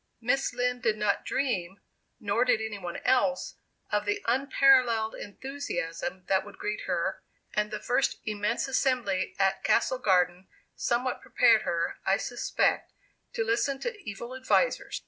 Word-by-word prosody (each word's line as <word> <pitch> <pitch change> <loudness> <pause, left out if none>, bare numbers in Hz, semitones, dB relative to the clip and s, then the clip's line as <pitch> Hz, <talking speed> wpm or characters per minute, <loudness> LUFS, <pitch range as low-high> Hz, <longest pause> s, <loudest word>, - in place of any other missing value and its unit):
Miss 260 +4 +1
Lind 250 0 -1
did 220 -2 +1
not 210 -1 0
dream, 195 -9 -1 0.4
nor 210 +3 +1
did 250 -3 +3
any 220 -2 -4
one 175 -2 -5
else, 260 +1 +1 0.3
of - - +1
the 410 -1 -1
unparalleled 255 -3 +4
enthusiasm 235 -4 -5
that 190 -1 +2
would - - -12
greet 410 +2 -4
her; - - -1 0.3
and 210 0 0
the 215 - -4
first 250 +3 0
immense 215 +6 -1
assembly 250 -8 0
at 195 0 +1
Castle 255 +2 +2
Garden 180 -4 +2 0.3
somewhat 245 +1 -1
prepared 225 -2 +4
her, 170 -3 -2
I 195 +1 +3
suspect, 245 +3 0 0.4
to 225 - 0
listen 240 +5 +1
to 485 - -3
evil 235 +2 -7
advisers. 260 - +1
235 Hz, 145 wpm, -28 LUFS, 200-260 Hz, 0.4 s, unparalleled